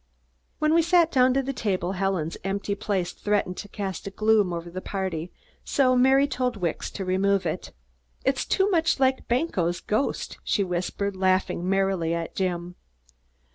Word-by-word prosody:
When 305 0 +2
we 335 - +5
sat 340 0 +4
down 255 -1 +4
to 275 - +2
the 275 +1 -3
table, 190 -7 -1
Helen's 185 -4 -1
empty 200 +1 -2
place 195 -3 -2
threatened 205 -3 -1
to 205 - -6
cast 195 -2 -5
a - - -2
gloom 215 -1 +2
over 170 0 -4
the 185 +1 -5
party, 185 -4 -3 0.3
so 255 -2 +2
Mary 265 +2 +5
told 250 -4 -1
Wicks 175 -4 -2
to 195 - -5
remove 195 +1 +1
it. - - -3 0.5
"It's 270 0 +1
too 385 0 +2
much 330 -5 +2
like 265 0 +2
Banquo's 195 - 0
ghost," 215 +6 -2
she 205 - +1
whispered, 185 +2 -2
laughing 185 -1 +1
merrily 190 -4 +1
at 165 -1 -4
Jim. 180 -2 -2
200 Hz, 165 wpm, -25 LUFS, 185-255 Hz, 0.5 s, we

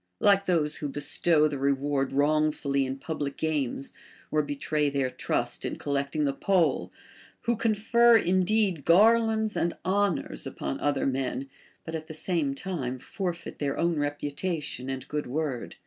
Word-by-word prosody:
— - - -51
like 200 0 +4
those 160 -5 +2
who 145 - -3
bestow 150 +2 +2
the 145 -2 -4
reward 140 0 0
wrongfully 145 -1 +1
in 135 +1 -4
public 145 -1 -4
games, 145 -4 -2 0.4
or 155 - +3
betray 145 +1 -1
their 135 -2 -1
trust - - -2
in - - -2
collecting 140 +1 -1
the 140 - +1
poll, 180 +3 +1 0.5
Avho 235 -2 +1
confer 230 +2 +4
indeed 185 -3 +2
garlands 220 +3 +4
and 170 - 0
honors 185 - 0
upon 70 - -4
other 145 -1 0
men, 135 0 -1 0.4
but 160 - -6
at 160 -1 -4
the 160 - -8
same 155 -4 -1
time 135 -7 -3
forfeit 175 +6 -5
their 140 -2 -1
own 170 -2 +1
reputation 145 -1 -3
and 130 0 -5
good 150 0 -3
Avord. 135 -2 -3
150 Hz, 150 wpm, -27 LUFS, 140-180 Hz, 0.5 s, like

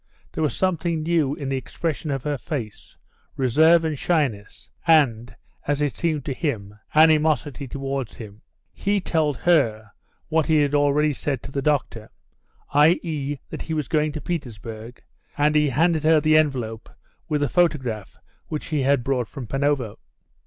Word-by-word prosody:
There - - -4
was 150 - 0
something 170 -3 0
new 155 -4 +1
in 145 -4 -6
the 135 - 0
expression 155 +4 -4
of 135 -2 -2
her 145 -2 -2
face, 120 -10 -6 0.4
reserve 160 +6 +4
and 155 -1 -1
shyness, 130 -12 -1 0.2
and, 125 -8 +3 0.3
as 145 0 +1
it 145 -2 -1
seemed 155 -5 -1
to 140 - -2
him, 110 -9 -3 0.2
animosity 150 -3 +3
towards 135 -2 -4
him. 105 -1 -10 0.3
He 205 0 0
told 155 -6 0
her 115 -12 +1 0.4
what 160 -1 +1
he 155 -2 +4
had 145 0 -1
already 145 +1 +3
said 135 -2 -3
to - - -8
the 140 - -2
doctor, 135 -6 -1 0.6
i.e., 150 -1 +2
that - - -5
he 160 - -4
was 150 -4 -2
going 155 -2 +1
to 155 - -5
Petersburg, 115 -7 -6 0.3
and 150 +1 +3
he 150 -1 +3
handed 160 +4 +2
her 160 0 +5
the 155 +1 +3
envelope 125 -8 0 0.4
with 150 -1 0
the 145 - +2
photograph 130 - 0 0.3
which 150 - -4
he 150 -3 0
had 135 -1 +2
brought 125 -3 -1
from 130 +4 -8
Panovo. 135 -2 -1
145 Hz, 160 wpm, -23 LUFS, 130-155 Hz, 0.6 s, her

